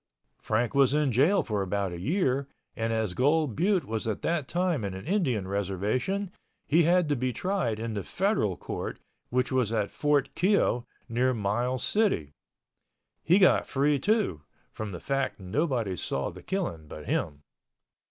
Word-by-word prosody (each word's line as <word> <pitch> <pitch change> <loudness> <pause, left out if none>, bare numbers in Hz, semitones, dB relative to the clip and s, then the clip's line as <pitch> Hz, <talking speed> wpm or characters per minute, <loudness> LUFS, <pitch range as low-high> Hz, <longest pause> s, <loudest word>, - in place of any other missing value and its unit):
Frank 115 +3 0
was 140 0 +4
in 150 -3 +2
jail 150 - +4
for 105 -2 -1
about 95 0 -1
a 85 - -6
year 140 - +1 0.3
and 115 0 -1
as 110 -4 0
Gold 145 - +2
Butte 185 -1 +2
was 110 -1 -3
at 110 - -3
that 165 -5 0
time 175 - 0
an 95 -2 -3
Indian 130 - -1
reservation, 105 - -1 0.3
he 165 +3 +4
had 175 0 +4
to 145 - +2
be 130 0 -1
tried 180 - -1
in 115 0 -3
the 100 - -2
Federal 185 - 0
Court - - -5 0.3
which 125 +1 0
was 125 -4 +1
at 105 -3 0
Fort 145 -2 +1
Keogh 160 - +2 0.2
near 125 +2 +1
Miles 120 +5 -1
City. 195 - +1 0.9
He 175 +3 +4
got 190 -2 +4
free, 140 +1 +2
too, 205 - +1 0.3
from 110 -2 -5
the 90 - -6
fact 135 +1 -1
nobody 115 - -1
saw 70 -5 -2
the - - -11
killing 130 - -3
but 75 0 -9
him. 75 -1 -2
125 Hz, 160 wpm, -28 LUFS, 105-165 Hz, 0.9 s, was